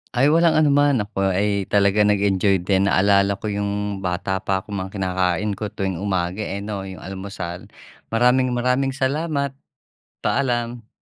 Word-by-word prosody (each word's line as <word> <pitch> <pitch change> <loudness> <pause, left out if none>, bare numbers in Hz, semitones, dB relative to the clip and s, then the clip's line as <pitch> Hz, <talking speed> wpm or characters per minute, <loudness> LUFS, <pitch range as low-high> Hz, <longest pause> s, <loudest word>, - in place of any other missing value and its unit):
Ay 135 +4 +4
walang 165 +1 +4
anuman. 145 -5 +3
Ako 95 -2 -1
ay 100 0 0
talaga 100 0 +2
nag-enjoy 100 -2 +2
din, 95 +1 +2
naalala 100 0 +3
ko 105 +2 -5
yung 100 0 -2
bata 95 +1 -2
pa 95 0 -1
ako, - - -14
mga 95 -1 -4
kinakain 95 +1 0
ko 105 - -3
tuwing 95 -3 -3
umaga, 95 -1 -2
eh, 100 -1 -4
'no, 100 -2 -5
yung 95 -1 -9
almusal. 95 -2 -6 0.5
Maraming-maraming 125 +2 +2
salamat. 140 +1 -1 0.7
Paalam. 120 -3 -1
100 Hz, 140 wpm, -22 LUFS, 95-120 Hz, 0.7 s, Ay